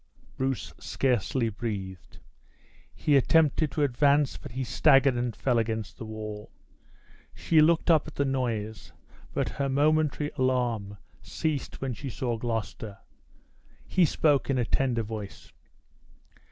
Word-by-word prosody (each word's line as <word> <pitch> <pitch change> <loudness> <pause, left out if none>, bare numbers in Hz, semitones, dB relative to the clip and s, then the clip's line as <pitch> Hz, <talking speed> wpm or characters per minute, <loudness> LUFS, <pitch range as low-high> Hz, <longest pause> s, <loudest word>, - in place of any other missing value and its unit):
Bruce 130 -1 -2
scarcely 125 -1 0
breathed. 100 -5 -6 0.7
He 150 - +1
attempted 155 +2 +3
to 150 - +1
advance, 140 +1 +3
but - - -10
he 130 +1 -2
staggered 135 +2 +4
and 120 -1 -2
fell 125 -3 +1
against 110 -1 -3
the 115 - -6
wall. 110 -1 -7 0.9
She 160 -2 +3
looked 165 +2 +4
up 155 -2 +3
at 155 - -10
the 140 - +1
noise; 115 -6 -3 0.4
but - - -1
her 140 -1 -2
momentary 150 +1 +1
alarm 120 -6 0 0.2
ceased 155 -3 -3
when 135 -2 -2
she 135 +4 -6
saw 120 0 -2
Gloucester. 110 -3 -4 0.9
He 185 -2 +3
spoke 145 -2 +2
in 135 - +1
a 120 - +1
tender 120 -2 0
voice. 105 -2 -8
130 Hz, 130 wpm, -27 LUFS, 110-140 Hz, 0.9 s, staggered